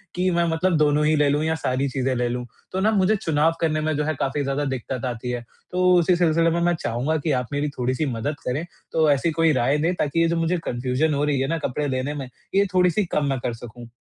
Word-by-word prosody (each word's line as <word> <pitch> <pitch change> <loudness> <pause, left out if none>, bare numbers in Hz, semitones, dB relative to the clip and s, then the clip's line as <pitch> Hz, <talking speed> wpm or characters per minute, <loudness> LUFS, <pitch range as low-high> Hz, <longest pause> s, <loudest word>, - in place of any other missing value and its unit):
कि 185 +1 +1
मैं 170 0 +2
मतलब 165 +1 +1
दोनों 150 0 +3
ही 155 - +3
ले 145 -1 +3
लूँ 145 +2 +1
या 160 0 0
सारी 135 -1 -1
चीज़ें 130 0 -1
ले 120 0 0
लूँ। 125 0 -3 0.3
तो 190 - -2
ना 215 +3 +3
मुझे 200 +1 +3
चुनाव 160 -4 +1
करने 155 -2 +1
में 155 -1 0
जो 150 - 0
है 155 +1 0
काफ़ी 140 +2 -1
ज़्यादा 140 +1 -1
दिक़्क़त 130 -1 -4
आती 125 0 -4
है। 120 -1 -4 0.3
तो 180 0 +3
उसी 175 +2 +3
सिलसिले 165 -1 +3
में 170 +1 0
मैं 175 0 +3
चाहूँगा 140 +3 -1
कि 150 +1 -1
आप 125 -2 0
मेरी 145 +1 0
थोड़ी-सी 130 +4 0
मदद 135 +3 -2
करें। 140 +7 -1 0.3
तो 160 -2 +3
ऐसी 145 +4 +1
कोई 165 0 +3
राय 130 +3 +2
दें 165 +4 +1
ताकि 150 +1 -1
ये 165 - +4
जो 170 - 0
मुझे 165 +2 +1
कन्फ्यूज़न 125 +5 0
हो 145 +1 0
रही 145 -2 +1
है 135 - 0
ना 165 +3 -1
कपड़े 145 +3 -2
लेने 130 +2 -2
में 140 -3 -5 0.3
ये 200 +1 +5
थोड़ी-सी 180 +2 +3
कम 150 - +1
मैं 135 - -1
कर 120 - -1
सकूँ। 120 0 -10
150 Hz, 255 wpm, -23 LUFS, 130-165 Hz, 0.3 s, ये